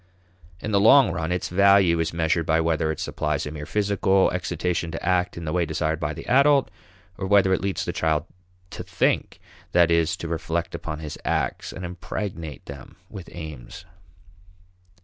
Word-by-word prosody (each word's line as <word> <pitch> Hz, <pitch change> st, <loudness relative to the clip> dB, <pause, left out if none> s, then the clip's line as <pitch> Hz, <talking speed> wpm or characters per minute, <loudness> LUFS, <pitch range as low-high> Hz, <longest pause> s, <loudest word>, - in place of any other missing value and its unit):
In 110 Hz, -, -4 dB
the 100 Hz, -, +3 dB
long 120 Hz, +5 st, +6 dB
run, 80 Hz, +1 st, -3 dB
its 90 Hz, 0 st, -2 dB
value 100 Hz, -2 st, +4 dB
is 80 Hz, 0 st, 0 dB
measured 85 Hz, 0 st, 0 dB
by 80 Hz, 0 st, +3 dB
whether 80 Hz, -1 st, +1 dB
it 80 Hz, -, -6 dB
supplies 75 Hz, -2 st, -2 dB
a 75 Hz, -, -5 dB
mere 75 Hz, -1 st, -7 dB
physical 100 Hz, -2 st, +2 dB
excitation 90 Hz, -1 st, -2 dB
to -, -, -6 dB
act 90 Hz, 0 st, +1 dB
in 85 Hz, -, -6 dB
the 75 Hz, -, -3 dB
way 90 Hz, -1 st, +2 dB
desired 80 Hz, 0 st, -1 dB
by 75 Hz, -, -2 dB
the 80 Hz, +1 st, -8 dB
adult 140 Hz, +2 st, +4 dB, 0.5 s
or 95 Hz, -, -3 dB
whether 95 Hz, -1 st, +4 dB
it -, -, 0 dB
leads 100 Hz, -1 st, -2 dB
the -, -, -3 dB
child 80 Hz, -1 st, 0 dB, 0.5 s
"to -, -, -7 dB
think" -, -, -1 dB, 0.3 s
that 85 Hz, -1 st, +4 dB
is, 85 Hz, -1 st, +2 dB
to 85 Hz, -, -6 dB
reflect 85 Hz, +1 st, -3 dB
upon 80 Hz, -3 st, -5 dB
his 75 Hz, -2 st, -7 dB
acts -, -, -2 dB
and 90 Hz, -, -7 dB
impregnate 85 Hz, -, -6 dB
them 70 Hz, -2 st, -10 dB, 0.2 s
with 95 Hz, -3 st, -9 dB
aims. 80 Hz, +1 st, -9 dB
85 Hz, 180 wpm, -24 LUFS, 80-95 Hz, 0.5 s, long